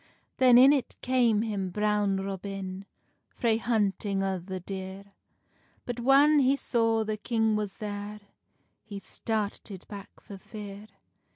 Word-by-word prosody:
Then 250 -2 +6
in 265 +3 +8
it 275 -4 -2
came 240 -4 +2
him 200 -4 -2
Brown 210 0 +1
Robin, 195 0 -5 0.4
Frae 230 -3 0
hunting 205 -3 0
O 190 -1 -1
the 185 +1 -6
deer; 190 +1 -8 0.7
But 245 -1 -4
whan 280 +4 +5
he 270 0 +4
saw 225 -4 +1
the 215 0 -3
king 225 0 0
was 210 -2 -3
there, 205 0 -6 0.6
He 205 -2 -8
started 210 -3 -4
back 200 -2 -10
for 200 -2 -11
fear. 205 0 -9
210 Hz, 130 wpm, -28 LUFS, 195-230 Hz, 0.7 s, in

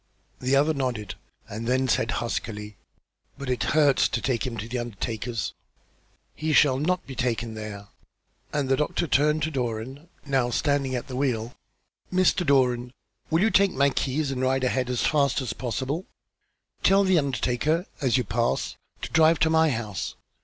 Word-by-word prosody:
The 130 +2 +1
other 150 +3 +3
nodded, 120 -9 -3 0.3
and 110 +3 -6
then 130 +1 +2
said 115 -1 +1 0.2
huskily: 105 -3 -4 0.6
"But 140 -2 -3
it 125 - -1 0.2
hurts 145 -4 +5
to 120 - -1
take 130 0 -1
him 115 -2 -5
to 105 - -4
an 120 +1 -2
undertaker's!" 115 0 -4 0.8
"He 155 0 -2
shall 135 -4 +5
not 180 +5 0
be 135 - -8
taken 115 -2 -1
there," 105 -2 -7 0.6
and 145 -2 -1
the 135 - +3
doctor 150 +4 -1
turned 150 0 +2
to 160 - -1
Doran, 130 +4 -4 0.2
now 135 -4 +1
standing 140 +1 0
at 125 - -3
the 130 - -6
wheel. 125 -4 -1 0.6
"Mr. 185 0 +3
Doran, 125 -4 +2 0.4
will 160 +2 +2
you 220 +2 +3
take 200 -1 +4
my 140 +1 +3
keys 140 +2 -1
and 130 -1 -3
ride 130 0 +1
ahead 125 0 0
as 125 -1 0
fast 145 -2 +2
as 130 -3 -3
possible? 130 - -3 0.7
Tell 195 +1 +5
the 190 -3 +4
undertaker, 140 +5 0 0.2
as 130 -2 +3
you 125 - +1
pass, 115 +2 -1 0.3
to - - -3
drive 160 0 +5
to 160 - +4
my 160 0 +4
house. 110 -7 -3
130 Hz, 170 wpm, -26 LUFS, 120-150 Hz, 0.8 s, hurts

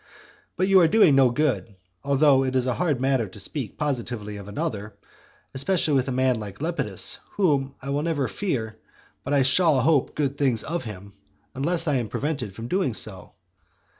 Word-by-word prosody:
But 185 +1 +1
you 195 -1 +6
are 170 - +5
doing 175 -4 +5
no 135 -2 +5
good, 120 -5 -1 0.3
(although 140 -1 +4
it 130 0 -2
is 130 -1 +2
a 130 - 0
hard 155 -3 0
matter 130 -4 +1
to 95 +2 -12
speak 115 +2 -2
positively 120 -7 -3
of 100 -1 -10
another,) 105 0 -4 0.6
especially 155 +2 +1
with 135 -1 +2
a - - -2
man 130 -2 +1
like 100 -2 -8
Lepidus, 165 +4 -1
whom 140 -8 +1
I 140 - -4
will 145 +1 0
never 150 -5 -1
fear, 115 - -3 0.4
but 140 - -5
I 140 -2 +4
shall 150 +2 +3
hope 145 0 +2
good 140 -2 -2
things 130 -6 +2
of 170 -2 -4
him 100 -2 -9 0.4
unless 165 +5 0
I 145 -3 +2
am 120 -4 -3
prevented 135 -9 -3
from 115 +2 -7
doing 140 - 0
so. 95 -4 -3
135 Hz, 185 wpm, -24 LUFS, 115-150 Hz, 0.6 s, you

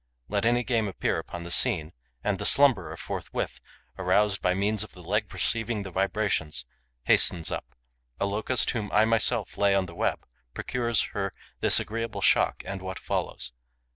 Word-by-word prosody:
Let 100 +1 0
any 120 +1 +2
game 115 -4 0
appear 95 - -1
upon 85 -1 -7
the 85 - -6
scene; 85 -8 +2 0.3
and 100 -2 0
the - - -3
slumberer, 135 -10 +4
forthwith - - -5 0.4
aroused 100 +2 +2
by 90 0 +2
means 105 +2 0
of 110 - -12
the 90 - -13
leg 105 +4 -1
receiving 115 -2 -1
the 95 - -8
vibrations, 95 - -1 0.4
hastens 85 +4 +4
up. - - -6 0.4
A - - +1
Locust 110 +5 0
whom 110 -4 -4
I 110 - +5
myself 115 -1 +1
lay 100 -1 +4
on 95 -1 +2
the 85 - -10
web - - -1 0.3
procures 120 -2 0
her 100 -2 -3 0.2
this - - +6
agreeable 115 +1 -4
shock - - +3
and 100 -1 -5
what 95 0 -5
follows. - - -4
100 Hz, 170 wpm, -27 LUFS, 95-115 Hz, 0.4 s, this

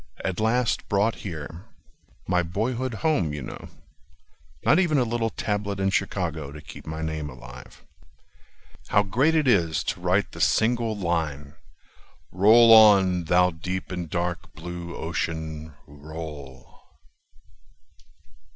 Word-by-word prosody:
At 95 -2 -2
last 115 +2 0
brought 105 +2 +1
here— 85 0 -7 0.6
My 90 -1 +2
boyhood 115 +8 -2
home, 115 - +1
you 75 -3 -5
know— - - -9 1.0
Not 155 - +5
even 170 -5 +2
a 130 - +3
little 115 -1 -1
tablet 105 -2 -3
in 95 0 +1
Chicago 80 -7 -2
To 75 - -9
keep - - -12
my 80 +1 -5
name 80 -2 -3
alive. 65 -1 -13 1.0
How 100 - +3
great 130 +11 +2
it 155 -3 +2
is 85 -9 +2
to 100 -4 -4
write 90 +3 +1
the - - -7
single 115 -1 +2
line: 80 -6 -2 0.8
"Roll 115 +5 +7
on, 95 -5 +6
thou 90 +2 +3
deep 90 +4 -5
and 90 -3 -4
dark 85 +1 -3
blue 85 -1 -7
Ocean, 80 -2 -4
roll! 75 -2 -10
90 Hz, 125 wpm, -25 LUFS, 80-110 Hz, 1.0 s, Roll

